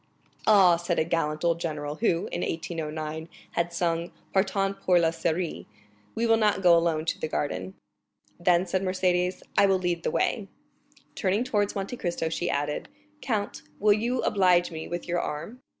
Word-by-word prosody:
"Ah," 190 -5 +7
said 175 0 -2
a - - +3
gallant 155 -1 -1
old 170 -1 +2
general, 150 -3 -3
who, 175 -7 +1
in 175 - -2
1809, 160 -1 -4 0.2
had 170 0 -1
sung 170 0 -1 0.2
Partant 195 0 +1
pour 180 -1 +4
la 165 -1 +3
Syrie,—"we 130 - -4
will 225 -1 +4
not 210 -3 +2
go 175 -1 +7
alone 165 -2 +1
to - - -1
the - - -1
garden." 95 -12 -3 0.6
"Then," 175 +1 +3
said 190 +1 -1
Mercédès, 185 -1 0 0.2
"I 200 - +6
will 190 -1 +3
lead 175 -2 -1
the - - -1
way." 210 -4 0 0.7
Turning 200 +4 +1
towards 205 -5 0
Monte 200 +5 -4
Cristo, 170 -4 -2
she 175 +2 -2
added, 145 +1 -2 0.3
"count, 205 -2 -2 0.2
will 210 0 +5
you 240 +4 -1
oblige 180 -3 +3
me 160 -1 -6
with 175 0 -5
your 175 0 0
arm?" 170 +14 -5
175 Hz, 165 wpm, -27 LUFS, 160-195 Hz, 0.7 s, Ah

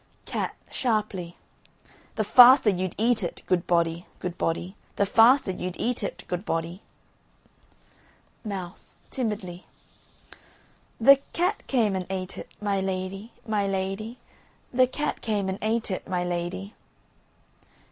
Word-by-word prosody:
CAT. - - -3 0.2
(sharply). 210 -8 -1 0.8
The 220 - +1
faster 245 +1 +8
you'd 185 -1 -3
eat 230 +1 +2
it, 175 - -4
good 180 -2 0
body, 170 0 +1
good 180 -1 -5
body, 175 +3 -2 0.2
The 200 - +2
faster 230 +2 +5
you'd 180 0 -4
eat 245 0 0
it, 200 - -5
good 180 +1 -3
body. 165 +1 -3 1.6
MOUSE 190 -5 -6 0.2
(timidly). 200 -8 -4 1.3
The 275 +4 +8 0.2
cat 360 +5 0
came 225 -7 +2
and 185 -1 -3
ate 185 -1 -4
it, - - -9
my 200 -2 0
lady, 190 +3 -4 0.2
my 210 -2 +1
lady, 195 +5 -3 0.6
The 255 +1 +5
cat 295 +4 -3
came 205 -3 -1
and 190 +1 -3
ate 220 0 0
it, 185 - -4
my 180 -1 0
lady. 180 +3 -3
195 Hz, 125 wpm, -26 LUFS, 180-225 Hz, 1.6 s, faster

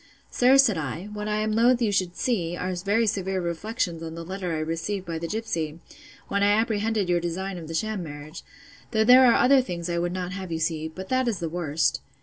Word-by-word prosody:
Sir, 255 +2 +5
said 230 -11 +4
I, 160 +7 -5
what 210 0 -4
I 210 - 0
am 215 0 0
loath 235 +3 +4
you 225 -4 +1
should 185 -3 0
see, 175 -8 -1
are 185 +1 -2
very 200 +6 +1
severe 195 -3 -1
reflections 175 +1 -3
on 165 0 -6
the 165 0 -7
letter 185 0 -4
I 160 - -1
received 165 +5 -3
by 165 -2 -4
the 170 - -4
gipsy, 165 -7 -3 0.5
when 200 0 -1
I 205 0 +4
apprehended 220 -2 0
your 175 -1 +2
design 180 +2 -4
of 160 - -9
the 165 - -5
sham 215 +3 -1
marriage; 150 0 -8 0.5
though 220 0 +3
there 250 +3 +8
are 235 - +5
other 265 +2 +5
things 175 -7 -4
I 170 - 0
would 175 0 -1
not 180 0 -4
have 190 -2 -6
you 165 - -1
see; 160 0 -1
but 185 +4 -9
that 255 -1 +1
is 225 -4 0
the 170 -1 -3
worst. 160 -2 0
185 Hz, 230 wpm, -25 LUFS, 165-215 Hz, 0.5 s, there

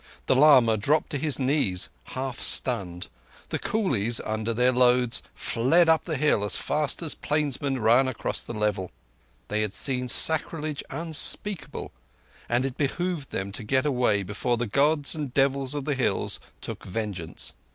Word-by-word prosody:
The - - +3
lama 130 -6 +6
dropped 145 +9 +1
to 145 - -1
his 150 -2 0
knees, 130 -9 0 0.2
half 130 -1 -5
stunned; 95 -9 +1 0.4
the - - -2
coolies 120 - 0
under 110 +1 -2
their 125 +2 +3
loads 125 -1 +3
fled 160 +9 +2
up 160 -1 +3
the 160 -4 -2
hill 140 -7 +2
as 105 - +1
fast 150 +2 -1
as 155 - -1
plainsmen 145 -2 -1
run 120 +3 +4
aross 130 - -2
the - - -7
level. 105 -3 -1 0.6
They 105 - -1
had 105 -1 -2
seen 125 -2 0
sacrilege 155 +2 +1
unspeakable, 165 +5 -2 0.6
and 120 +2 +1
it 135 -2 -4
behoved 160 +1 -2
them 95 +1 -4
to 105 +4 -5
get 130 +5 +1
away 125 -8 +1
before 115 +5 -1
the 120 - -1
Gods 145 +6 +1
and 150 -5 -4
devils 135 0 +1
of 145 -2 -3
the 145 - 0
hills 135 -2 -1 0.2
took - - -7
vengeance. 95 -5 -4
130 Hz, 160 wpm, -26 LUFS, 115-150 Hz, 0.6 s, lama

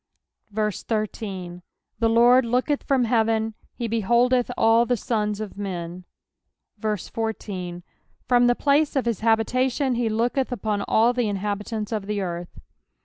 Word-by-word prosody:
13 210 -4 -3 0.4
The 230 -1 +3
Lord 240 +3 +6
looketh 250 +5 0
from 270 -3 +1
heaven; 225 -1 +1 0.2
he 235 - -3
beholdeth 235 +3 +2
all 225 +1 +5
the 245 - +1
sons 210 -2 -1
of 210 -2 -7
men. 180 -2 -5 0.7
14 205 -4 -4 0.4
From 245 -1 +4
the 245 - +3
place 290 +3 +2
of 270 - +1
his 230 -5 -1
habitation 250 +4 +1
he 235 -1 0
looketh 240 +4 0
upon 215 -3 -1
all 230 +3 +4
the 245 -3 0
in 205 - -1
habitants 210 +2 -3
of 210 -3 -3
the 210 -1 -1
earth. 175 -2 -4
225 Hz, 140 wpm, -24 LUFS, 205-245 Hz, 0.7 s, Lord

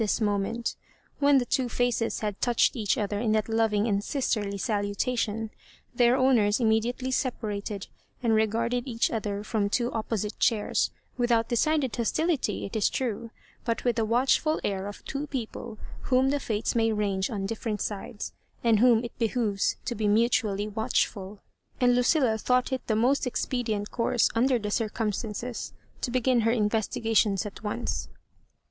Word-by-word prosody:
81 - - +2
this 210 - 0
moment 210 +3 -1 0.4
When 285 -1 +5
the 250 - +2
two 250 0 0
faces 240 -1 0
had 210 -2 -3
touched 240 +1 +3
each 215 -5 0
other 205 -1 -1
in 220 -1 +1
that 215 -1 +1
loving 225 -1 +1
and 200 -2 +1
sisterly 215 -7 -1
salutation, 215 +1 -1 0.4
their 240 +1 +4
owners 235 -5 +3
immediately 235 +3 +1
separated, 210 -6 -2 0.4
and 230 -2 +3
regard 225 +2 +1
ed 245 +2 -1
each 230 -2 0
other 205 -2 -2
from 210 -2 0
two 240 +3 0
opposite 215 -1 -3
chairs, 220 -4 +2 0.3
without 235 -2 +2
decided 265 -1 +1
hostility, 265 - 0
it 200 - -7
is 215 - +3
true, 230 -3 -3 0.4
hut 230 - -1
with 245 -2 +1
the 225 - +2
watchful 260 +7 +2
air 195 -1 -2
of 205 - -9
two 280 +2 -4
people 235 -5 -5 0.3
whom 260 +1 +3
the 290 - 0
fates 220 -4 -1
may 225 -1 +2
rangj^on 200 -1 -1
different 220 0 -3
sides, 205 +1 -5 0.3
and 225 -3 +4
whom 235 -1 +5
it 235 - -7
behoves 225 -3 +1
to 240 - -1
be 215 -2 -1
mutu 225 +3 +3
ally 205 0 -2
watchfiU. 210 -2 -1 0.4
And 245 -1 +4
Lucilla 245 -2 +3
thought 250 +3 +1
it 260 - -1
the 220 - +1
most 250 +5 +2
expedient 225 -4 -2
course, 235 -1 +2
under 250 +2 +3
the 210 -2 -4
circumstances, 220 +1 -2 0.3
to - - -1
be 255 +1 0
gin 250 0 +3
her 225 0 +2
investigations 220 -2 +1
at 205 - -8
once. 215 +3 -3
225 Hz, 165 wpm, -27 LUFS, 210-245 Hz, 0.4 s, When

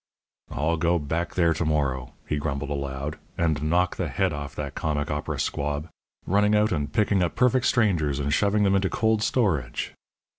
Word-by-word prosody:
"I'll 80 +2 0
go 85 +2 +2
back 80 +3 -3
there 85 -2 +3
to 85 - -2
morrow," 70 -5 -1
he 75 - -1
grumbled 70 -1 -3
aloud, 70 +1 -4 0.2
"and 80 -3 +1
knock 85 +3 +1
the - - -1
head 95 -4 0
off 75 -1 -6
that - - -4
comic 75 -1 -2
opera 75 0 -3
squab. 75 +2 -2 0.4
Running 105 +2 +3
out 105 +1 +3
and 75 -4 -1
picking 100 0 +2
up 85 -3 0
perfect 125 0 +3
strangers, 85 - +2
and 70 0 -1
shoving 105 +3 +2
them 100 -1 +3
into 95 -1 +2
cold 110 -1 +1
storage!" 95 - 0
80 Hz, 180 wpm, -25 LUFS, 75-100 Hz, 0.4 s, there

